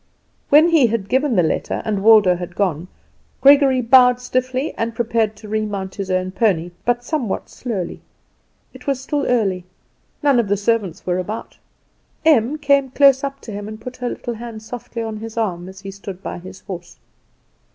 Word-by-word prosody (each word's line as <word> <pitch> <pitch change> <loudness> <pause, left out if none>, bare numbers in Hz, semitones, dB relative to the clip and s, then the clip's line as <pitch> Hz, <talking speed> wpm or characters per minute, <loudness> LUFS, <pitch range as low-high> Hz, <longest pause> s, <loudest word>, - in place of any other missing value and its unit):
When 310 +4 +6
he 315 -7 +5
had 210 -3 -2
given 265 +1 +1
the 180 - +4
letter, 160 - -1
and 205 -3 -1
Waldo 210 -4 +6
had 175 0 -7
gone, 180 -4 -1 0.5
Gregory 275 -2 +6
bowed 250 0 +6
stiffly 255 +3 -2
and 230 0 -3
prepared 225 -2 0
to 215 - -12
remount 205 -3 -3
his 195 -1 -5
own 185 0 0
pony, 185 -5 +1
but 245 0 +1
somewhat 245 -7 -3
slowly. 210 -8 -5 0.7
It - - -14
was 275 -2 0
still 285 +2 -2
early; 200 -7 +1 0.6
none 280 -4 +4
of 230 - +1
the 205 +1 +1
servants 205 -4 -1
were 180 0 0
about. 210 +5 -6 0.7
Em 295 -2 +4
came 280 -2 +2
up 255 - -23
close 275 -1 +5 0.2
to 225 - -9
him 205 0 -6
and 215 0 -8
put 250 +2 -8
her 250 -1 -3
little 240 - -5
hand 225 -1 -8
softly 230 0 -6
on 220 -1 -5
his 225 +1 -8
arm 185 -5 -2
as 190 0 -12
he 195 -1 -7
stood 195 -1 -9
by - - -5
his 185 +1 -11
horse. 175 -2 -9
225 Hz, 185 wpm, -20 LUFS, 195-255 Hz, 0.7 s, When